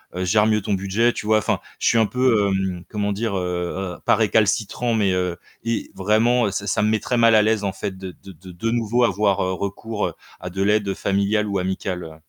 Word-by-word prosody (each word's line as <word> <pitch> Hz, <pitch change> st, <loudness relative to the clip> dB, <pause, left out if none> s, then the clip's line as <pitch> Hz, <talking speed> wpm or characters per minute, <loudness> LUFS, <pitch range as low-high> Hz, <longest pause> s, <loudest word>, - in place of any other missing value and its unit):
heu, 90 Hz, -, -2 dB
gère 105 Hz, +4 st, +3 dB
mieux 110 Hz, -1 st, +2 dB
ton 100 Hz, +1 st, -2 dB
budget, 100 Hz, +5 st, +1 dB
tu -, -, -6 dB
vois? 110 Hz, 0 st, +4 dB
Enfin, -, -, -1 dB, 0.2 s
je -, -, 0 dB
suis 115 Hz, -, +4 dB
un 110 Hz, -, +4 dB
peu, 115 Hz, -3 st, +2 dB
hem, 95 Hz, -2 st, -2 dB
comment 105 Hz, -1 st, -2 dB
dire? 105 Hz, 0 st, -2 dB
Heu, 90 Hz, 0 st, -3 dB
heu, -, -, -22 dB
pas -, -, +5 dB
récalcitrant, 110 Hz, +2 st, +1 dB
mais 100 Hz, -4 st, +2 dB
heu 90 Hz, -1 st, -1 dB, 0.3 s
et 115 Hz, 0 st, -2 dB
vraiment, 110 Hz, +3 st, +2 dB
ça 100 Hz, +1 st, -4 dB
ça -, -, +1 dB
me 105 Hz, -, +2 dB
met 110 Hz, 0 st, +1 dB
très 125 Hz, -, -2 dB
mal 115 Hz, -1 st, +5 dB
à 110 Hz, -, +6 dB
l'aise 110 Hz, 0 st, +1 dB
en 100 Hz, -, 0 dB
fait 95 Hz, 0 st, -5 dB
de 95 Hz, -1 st, -7 dB
de 95 Hz, -, -10 dB
de 90 Hz, +3 st, -13 dB
de 90 Hz, +6 st, -3 dB
nouveau 120 Hz, +1 st, +1 dB
avoir, 100 Hz, -2 st, +1 dB
heu, 95 Hz, 0 st, 0 dB
recours, 105 Hz, +3 st, -3 dB
heu, -, -, -6 dB, 0.3 s
à 90 Hz, -, -5 dB
de 95 Hz, +2 st, -4 dB
l'aide 100 Hz, 0 st, +2 dB
familiale 100 Hz, +2 st, 0 dB
ou 100 Hz, -1 st, -1 dB
amicale, 95 Hz, -1 st, -3 dB
heu 80 Hz, -1 st, -10 dB
100 Hz, 240 wpm, -22 LUFS, 95-110 Hz, 0.3 s, à